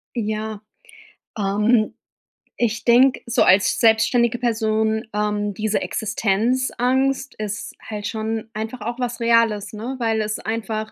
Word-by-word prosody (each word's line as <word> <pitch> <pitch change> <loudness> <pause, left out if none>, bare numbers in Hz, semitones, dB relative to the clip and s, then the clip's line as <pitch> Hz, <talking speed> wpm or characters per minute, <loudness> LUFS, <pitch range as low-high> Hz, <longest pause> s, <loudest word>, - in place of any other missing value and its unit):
Ja. 215 -1 -3 0.8
Ähm, 210 +3 +2 0.7
ich 220 -2 0
denke, 250 +2 +5
so 235 - +2
als 195 +2 +4
selbstständige 235 +1 +3
Person, 220 -1 0
ähm, 210 -1 -1
diese 215 +2 -1
Existenzangst 250 +5 0
ist 210 -1 -4 0.2
halt 210 -2 -5
schon 220 0 -3
einfach 220 +3 -5
auch 235 +3 -4
was 240 -1 -3
Reales, 230 -3 +2
ne? 235 +5 -5
Weil 225 -2 +1
es 215 0 -2
einfach 220 -1 -3
220 Hz, 120 wpm, -22 LUFS, 215-235 Hz, 0.8 s, denke